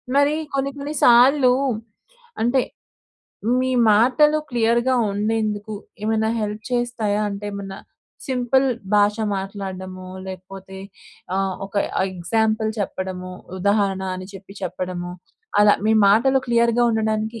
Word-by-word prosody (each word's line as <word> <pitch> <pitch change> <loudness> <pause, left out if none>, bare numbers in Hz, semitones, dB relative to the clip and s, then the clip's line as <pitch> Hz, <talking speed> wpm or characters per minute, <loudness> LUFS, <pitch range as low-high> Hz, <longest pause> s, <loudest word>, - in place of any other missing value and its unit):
మరి 285 +2 +4 0.2
కొన్ని 275 0 0
కొన్ని 285 +2 -5
సార్లు 250 +2 +6 0.9
అంటే 245 +3 +3 1.0
మీ 260 - 0 0.2
మాటలు 265 +8 +4
క్లియర్‌గా 235 +1 +2 0.2
ఉండేందుకు 215 0 -2 0.3
ఏమైనా 220 0 +1
హెల్ప్ 210 0 -4
చేస్తాయా? 240 -4 0
అంటే 200 0 -6
ఏమన్నా 195 -1 -7 0.5
సింపుల్ 260 0 +1 0.3
భాష 205 0 +4 0.2
మాట్లాడ్డమో 190 -1 -6 0.2
లేకపోతే, 190 +1 -9 0.6
ఆహ్, 195 -1 0
ఒక 195 - -21 0.4
ఎగ్జాంపుల్ 220 +4 0
చెప్పడమో, 185 -2 -4 0.3
ఉదాహరణ 200 0 +1
అని 185 0 -8
చెప్పి, 195 +1 -12
చెప్పడమో 180 0 -4 0.5
అలా 210 0 +7
మీ 220 - +4 0.2
మాటలు 245 +7 +4
క్లియర్‌గా 235 0 +2
ఉండడానికి 220 0 -1
215 Hz, 105 wpm, -22 LUFS, 195-240 Hz, 1.0 s, అలా